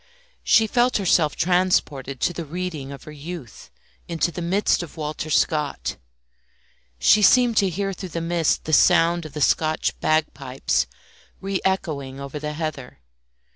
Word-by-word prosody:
She 225 - +5
felt 245 +3 +2
herself 170 -6 +2
transported 160 -7 0
to 175 - +1
the 170 - -5
reading 160 -3 -5
of 140 -2 -10
her 155 - -10
youth, 150 - -9 0.4
into 170 0 -1
the 175 - -6
midst 185 +4 +1
of 175 -1 -9
Walter 155 0 -4
Scott. 150 - 0 1.0
She 210 - +5
seemed 245 +2 +5
to 195 - +4
hear 195 +3 -2
through 185 0 -7
the 165 - -4
mist 165 -1 0
the 155 - -3
sound 170 0 +4
of 150 - -15
the 150 - -5
Scotch 155 +2 +1
bagpipes 140 -4 0 0.5
re 195 -1 -3
echoing 145 -8 -2
over 140 +2 -6
the 150 0 -4
heather. 150 - -5
165 Hz, 150 wpm, -23 LUFS, 150-180 Hz, 1.0 s, She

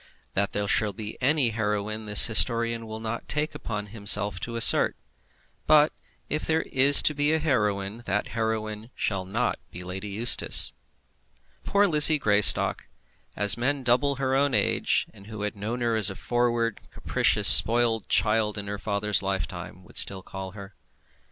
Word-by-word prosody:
That 100 +1 -3
there 105 0 -3
shall 105 +1 -1
be 105 +2 -8
any 140 -1 +1
heroine 110 0 -4
the 105 - -7
historian 115 +1 +3
will 110 0 -8
not 115 +1 -7
take 150 +1 -3
upon 105 -8 -7
himself 100 -3 0
to 115 +6 -8
assert; 115 - +5 0.7
but 150 0 +3 0.3
if 155 - -4
there 160 0 -1 0.5
be 145 +2 -1
a - - +1
heroine, 105 -8 -3
that 100 +2 -3
heroine 110 -1 -5
shall 95 -3 -3
not 115 +6 -3
be 90 - -9
Lady 95 +3 -8
Eustace. 110 +4 +2 0.9
Poor 200 +1 +1
Lizzie 155 -3 +7
Greystock! 105 -6 +2 0.5
as 105 -2 +4
men 135 +3 -2
double 125 +3 0
her 130 0 -3
own 140 -1 0
age, - - -1
and 100 - -17
who 110 -1 -8
had 105 0 -5
known 110 +5 -6
her 115 -1 -1
as 105 -2 +2
a 95 - -9
forward, 120 -1 -3
capricious, - - 0
spoilt 115 -1 +5
child 105 -1 0
in 100 - -6
her 100 0 -7
father's 105 0 -1
lifetime, 95 -2 -6
would - - -4
still 95 -1 -2
call 95 -1 -10
her. 100 -1 -12
110 Hz, 160 wpm, -24 LUFS, 100-120 Hz, 0.9 s, Lizzie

